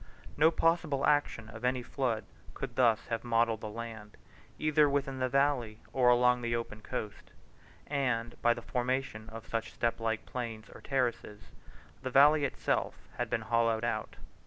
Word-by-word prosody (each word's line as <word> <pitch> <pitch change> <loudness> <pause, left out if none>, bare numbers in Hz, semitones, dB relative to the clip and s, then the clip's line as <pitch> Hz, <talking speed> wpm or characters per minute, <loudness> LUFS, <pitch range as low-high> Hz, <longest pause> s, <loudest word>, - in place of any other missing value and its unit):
No 155 +2 +6
possible 165 -4 +1
action 145 -6 +1
of 110 +1 -10
any 125 0 +1
flood 120 -4 -2 0.3
could 125 -3 -5
thus 115 -4 +3
have 115 - -2
modelled 115 -2 +1
the 110 - -5
land, 110 -1 -8 0.4
either 155 -1 +3
within 140 -1 -1
the 130 0 0
valley 135 -5 +1 0.2
or 125 -2 +4
along 125 0 +4
the 115 0 -1
open 110 -2 -5
coast; 105 -1 -6 0.6
and 125 -5 -1
by 120 0 +4
the - - -8
formation 125 -3 -2
of 115 0 -9
such 115 -1 -3
step 115 -1 -1
like 115 -1 -2
plains 115 -4 -6
or - - -12
terraces 120 -6 -2 0.5
the 130 - -3
valley 145 +3 +6
itself 135 - -1 0.2
had - - -2
been 115 - 0
hollowed 115 0 +1
out. 110 -2 -2
120 Hz, 160 wpm, -31 LUFS, 115-135 Hz, 0.6 s, No